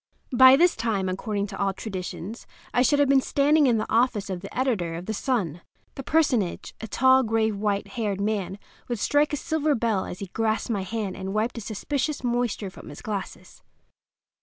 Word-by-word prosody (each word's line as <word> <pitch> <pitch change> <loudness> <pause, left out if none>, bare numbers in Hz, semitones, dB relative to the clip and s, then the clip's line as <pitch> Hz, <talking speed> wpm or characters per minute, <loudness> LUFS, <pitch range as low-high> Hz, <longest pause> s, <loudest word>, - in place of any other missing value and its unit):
By 260 +1 +8
this 345 +4 +4
time, 220 -4 -1
according 200 +2 -2
to 195 -1 -8
all 195 -1 +1
traditions, 195 +2 -6 0.3
I 245 - +3
should 285 +3 +4
have 285 -1 +4
been 270 0 +5
standing 290 +2 +3
in 235 -3 +3
the 215 - -1
office 225 -4 +2
of 185 - -3
the 195 - -9
editor 200 -11 0
of 170 +2 -6
the 220 - -3
Sun. 200 - -1 0.3
That 270 - -9
personage—a 240 - 0
tall, 260 +4 +4
grave, 220 -2 +1
white 200 0 -1
haired 210 -5 -2
man—would 205 +3 -4
strike 290 +7 +2
a 295 - -1
silver 310 +1 0
bell 225 -4 0
as 180 - -7
he 195 - -5
grasped 225 +1 0
my 205 -3 0
hand 200 0 -3
and 190 +1 -5
wiped 225 +2 -1
a - - -7
suspicious 265 +7 -3
moisture 240 -5 -1
from - - -12
his 145 - -11
glasses. 205 -3 -6
220 Hz, 185 wpm, -25 LUFS, 195-260 Hz, 0.3 s, By